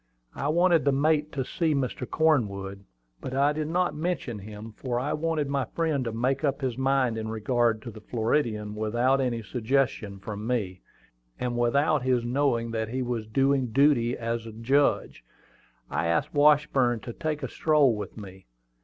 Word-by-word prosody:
I 140 - -3
wanted 170 +1 +3
the 140 - +3
mate 150 +2 +1
to 135 -2 -2
see 160 +1 0
Mr. 125 -2 -2
Cornwood; 100 -11 0 0.3
but 130 - -5
I 140 +2 +3
did 155 0 -3
not 180 +2 0
mention 150 -8 -3
him, 105 +2 -9
for 120 0 -2
I 140 +4 -1
wanted 155 -2 -1
my 140 -2 -1
friend 160 -5 -1
to 115 - -2
make 130 +5 -1
up 140 -1 0
his 130 -3 -1
mind 130 -3 +1
in 110 - -4
regard 115 0 0
to 120 - -7
the 110 0 -12
Floridian 110 -2 -1
without 120 +5 +1
any 120 -3 -1
suggestion 115 -3 -1
from 105 +2 -6
me, 100 -7 -2 0.6
and 125 -1 -2
without 140 +5 +2
his 125 -2 +1
knowing 120 -2 0
that 110 -1 -2
he 130 +2 -2
was 120 -3 -3
doing 135 +2 +2
duty 125 -1 +3
as 115 0 -3
a - - -7
judge. 135 +6 +1 0.6
I 85 - -1
asked 85 - 0
Washburn 145 -5 +3
to 120 - -7
take 155 -1 -3
a - - -1
stroll 145 -4 +3
with 105 - -7
me. 95 - -11
125 Hz, 175 wpm, -27 LUFS, 115-145 Hz, 0.6 s, wanted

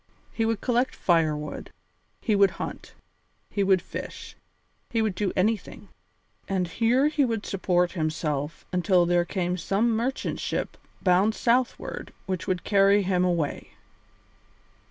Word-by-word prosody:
He 225 - 0
would 225 -2 -1
collect 245 +1 +1
firewood, 155 -4 0 0.5
he 215 - +1
would 200 -1 +5
hunt, - - -7 0.6
he 200 - 0
would 190 -2 +3
fish, - - -7 0.5
he 230 - 0
would 220 -3 +1
do 195 0 -1
anything. 215 +4 -1 0.6
And 185 -2 0
here 235 - +2
he 300 -1 +2
would 225 -4 -1
support 180 -2 +1
himself 155 -2 -2
until 180 0 +3
there 175 0 +2
came 180 -1 -2
some 205 +6 +1
merchant 245 +4 -2
ship - - -3 0.3
bound 195 +4 +3
southward 245 +1 -1
which 185 -2 -3
would 185 -3 -1
carry 200 0 +4
him 180 -1 +1
away. 170 -5 -1
195 Hz, 135 wpm, -26 LUFS, 175-225 Hz, 0.6 s, would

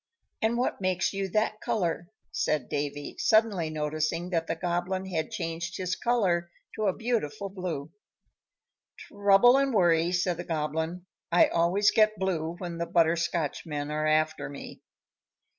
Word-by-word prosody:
"And 225 +1 +1
what 245 -4 -1
makes 185 0 0
you 195 0 -2
that 215 +2 0
color?" 180 -7 -1 0.2
said 150 -5 -1
Davy, 145 0 -3
suddenly 215 -7 +3
noticing 155 +3 -2
that 165 -2 0
the 165 - -1
Goblin 175 +3 -2
had 165 -4 -2
changed 165 +1 -4
his 185 0 -2
color 185 -8 +1 0.2
to 215 -1 -1
a 190 - +1
beautiful 215 -5 -2
blue. 170 -6 -5 1.1
"Trouble 205 +5 +4
and 275 0 +2
worry," 170 -5 +3
said 180 -1 0
the 175 - -4
Goblin. 160 +2 -3 0.3
"I 175 - +5
always 180 +5 +3
get 215 -1 +3
blue 170 -3 -1
when 175 -2 -6
the 170 - -2
Butterscotchmen 165 -3 0
are 155 0 0
after 155 +1 +1
me." 140 - -9
175 Hz, 140 wpm, -28 LUFS, 160-195 Hz, 1.1 s, I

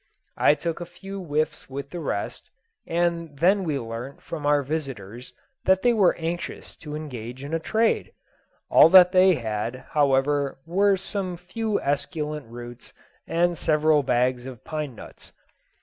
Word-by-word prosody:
I 150 - +5
took 165 +3 -4
a - - -4
few 195 +3 -8
whiffs 155 -1 -2
with 140 +1 -6
the 175 - -5
rest, 120 -10 -4 0.4
and 170 -3 -1
then 190 +6 +3
we 155 -5 -1
learnt 115 +2 -7
from 150 -3 -4
our 145 -1 +3
visiters 125 -6 -5 0.3
that 190 0 +3
they 245 - +4
were 200 -6 +4
anxious 170 +1 -5
to 150 -2 -7
engage 130 -4 -7
in 145 +3 -6
a 165 - +1
trade. 220 +7 +1 0.6
All - - +8
that 180 0 +8
they 185 -1 +5
had, 115 +1 -4
however, 140 -1 +2
were 195 +4 +3
some 185 -2 -4
few 210 +5 -2
esculent 150 0 -2
roots 120 0 -10 0.3
and 175 +1 +1
several 155 -1 +3
bags 125 -1 0
of 125 -4 -10
pine 150 -5 -4
nuts. - - -13
150 Hz, 150 wpm, -25 LUFS, 135-175 Hz, 0.6 s, All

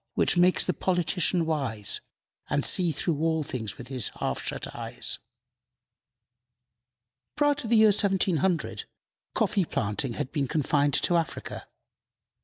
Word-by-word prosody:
which - - +3
makes 180 +1 +4
the 180 - 0
politician 175 -1 +1
wise, 130 -10 0 0.5
And 145 0 +1
see 175 -3 +3
through 155 +1 -2
all 160 -1 +1
things 110 -7 -5
with 125 - -10
his 130 -5 0
half - - -2
shut - - -5
eyes!" - - -4 2.2
Prior 290 0 +3
to 285 -5 -6
the 230 - +3
year 220 0 +7
1700, 190 -4 +1 0.5
coffee 210 -4 +2
planting 110 0 -2
had 130 - -4
been 140 -3 -1
confined 145 -1 +1
to 175 - +3
Africa. 165 - -4
165 Hz, 130 wpm, -27 LUFS, 140-185 Hz, 2.2 s, year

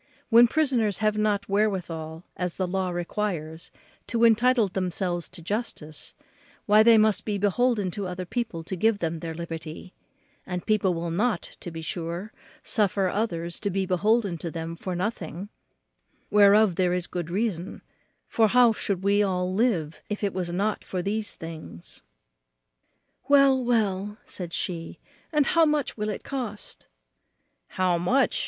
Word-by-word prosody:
When 235 +1 +8
prisoners 240 - +1
have 215 -1 +1
not 210 -1 0
wherewithal 175 -6 -1
as 180 -2 -3
the 185 - 0
law 185 0 -1
requires 175 -3 -3 0.4
to 235 -1 0
entitle 235 0 +5
themselves 180 -1 -2
to 180 -2 -9
justice, 170 -6 -5 0.5
why 210 +1 +6
they 230 0 +7
must 215 -2 +3
be 210 -2 -2
beholden 205 0 +1
to 200 +1 -4
other 180 0 -5
people 220 -5 -3
to 190 - -5
give 220 +4 +2
them 165 -3 -2
their 165 0 -5
liberty; 165 +1 -7 0.5
and 180 -1 -5
people 210 -5 +2
will 165 0 -3
not, 210 +3 0 0.2
to - - -7
be 165 -1 -7
sure, 170 +5 -4 0.3
suffer 200 -3 +1
others 175 -5 -2
to 205 - -1
be 195 0 -1
beholden 195 0 +1
to 170 - -4
them 165 0 -5
for 180 +2 -5
nothing, 185 -1 -4 0.8
whereof 205 -2 +5
there 180 -1 +2
is 180 -1 -1
good 175 -2 -5
reason; 190 -2 -2 0.4
for 225 -1 +3
how 245 +1 +5
should 195 -3 -3
we 200 +1 +3
all 185 -2 0
live 190 -8 0
if 210 0 -4
it 200 - 0
was 180 -2 -2
not 200 +4 -1
for 180 -2 -4
these 210 0 -2
things?" 160 - -9 1.3
"Well, 275 -2 +5
well," 210 -4 0
said 175 -3 -6
she, 170 -1 -4 0.3
"and 300 -3 +3
how 330 +2 +4
much 300 -3 0
will 210 -1 -2
it 210 - -5
cost?" 240 -7 -5 0.8
"How 180 -2 +1
much!" 245 +11 +2
195 Hz, 155 wpm, -26 LUFS, 175-215 Hz, 1.3 s, When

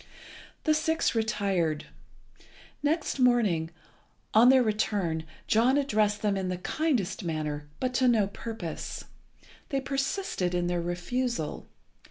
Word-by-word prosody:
The 310 - +3
six 320 +1 +1
retired. 200 -8 0 1.0
Next 295 0 0
morning, 220 -11 +3 0.6
on 230 +3 +7
their 260 -1 +6
return, 200 -7 0 0.2
John 240 +5 +3
addressed 215 -7 +1
them 205 -1 +2
in 190 -1 -2
the 180 - -2
kindest 240 - -1
manner, 150 -3 -3
but 255 -1 -1
to 255 +1 +3
no 225 -4 +4
purpose. 200 -3 -6 0.7
They 275 - 0
persisted 270 - -1
in 175 0 +1
their 175 0 0
refusal. 175 +3 -2
215 Hz, 120 wpm, -28 LUFS, 175-255 Hz, 1.0 s, on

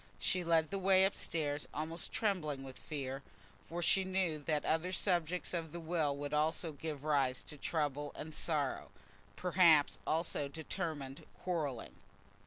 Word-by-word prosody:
She 185 - +2
led 165 -1 +3
the 195 - -1
way 190 0 +5
up 195 - +1
stairs, 145 -3 -2
almost 160 +2 -1
trembling 155 -10 0
with 135 -1 -9
fear, 135 -2 -4 0.5
for 170 +2 -3
she 190 +3 +5
knew 185 -4 0
that 150 0 0
that - - -7
other 165 +3 +1
subject 180 -2 0
of 165 -3 -2
the 170 - -5
will 160 -4 0
would 145 +1 -4
also 160 +2 +1
give 150 -1 -5
rise 140 -4 +2
to - - -9
trouble 145 -1 -1
and 155 +1 -6
sorrow, 150 -5 -1 0.5
perhaps, 170 -5 +5
also, 160 -3 0
to - - -12
determined 155 -3 -4 0.2
quarrelling. 150 -9 -2
160 Hz, 160 wpm, -35 LUFS, 145-175 Hz, 0.5 s, way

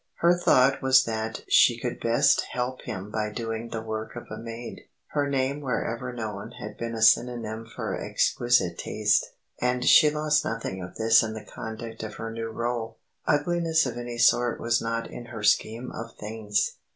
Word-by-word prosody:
Her 175 +1 +4
thought 135 -6 +4
was 130 -1 +6
that 110 -1 -4
she - - +5
could - - -4
best - - +3
help 125 +1 -2
him 95 +2 -6
by 105 -1 -1
doing 115 +1 -4
the 110 -1 -4
work 110 0 -5
of 120 - -7
a - - -5
maid. 115 +1 -8 0.2
Her 145 -1 0
name 135 +1 0
wherever 125 -1 -2
known 110 -4 -6
had 105 0 -7
been 115 +1 -4
a 110 - -1
synonym 115 -1 +2
for - - -4
exquisite 120 -8 +1
taste, 105 -1 +1 0.3
and 125 0 0
she 150 - +7
lost 150 0 +1
nothing 110 -4 -4
of 90 0 -8
this 110 0 +5
in 110 -1 -3
the 110 - -8
conduct 110 0 -7
of 110 -1 -6
her 115 +1 -5
new 115 0 -5
rôle. 115 0 -3 0.3
Ugliness 160 +1 +2
of 125 - -3
any 120 0 -5
sort 120 0 +3
was 115 0 +1
not 115 0 -2
in 120 - -9
her 115 -3 -8
scheme 115 +4 +1
of 115 0 -8
things. 105 -1 -2
115 Hz, 180 wpm, -26 LUFS, 110-125 Hz, 0.3 s, she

